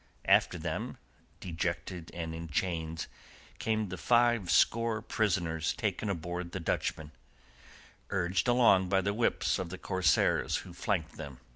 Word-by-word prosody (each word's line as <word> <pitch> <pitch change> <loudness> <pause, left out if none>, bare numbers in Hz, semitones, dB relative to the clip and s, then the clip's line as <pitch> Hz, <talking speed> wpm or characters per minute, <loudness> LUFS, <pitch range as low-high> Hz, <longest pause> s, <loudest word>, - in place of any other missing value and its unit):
After - - +4
them, - - -4 0.4
dejected 85 0 -3
and 80 -1 -4
in 85 0 -6
chains, 80 0 -2 0.5
came 110 -2 0
the 90 -1 -6
five 120 -5 +3
score 115 +5 +3
prisoners 85 -8 0
taken 105 - -2
aboard 85 -1 -4
the 95 - -3
Dutchman, 80 -1 -2 1.0
urged 90 0 0
along 115 -7 +5
by 95 0 +3
the 100 +2 0
whips 115 -2 +1
of 90 -2 -3
the 95 - -6
corsairs 90 -4 +2
who - - -10
flanked - - -2
them. 70 -3 -8
90 Hz, 135 wpm, -31 LUFS, 85-105 Hz, 1.0 s, along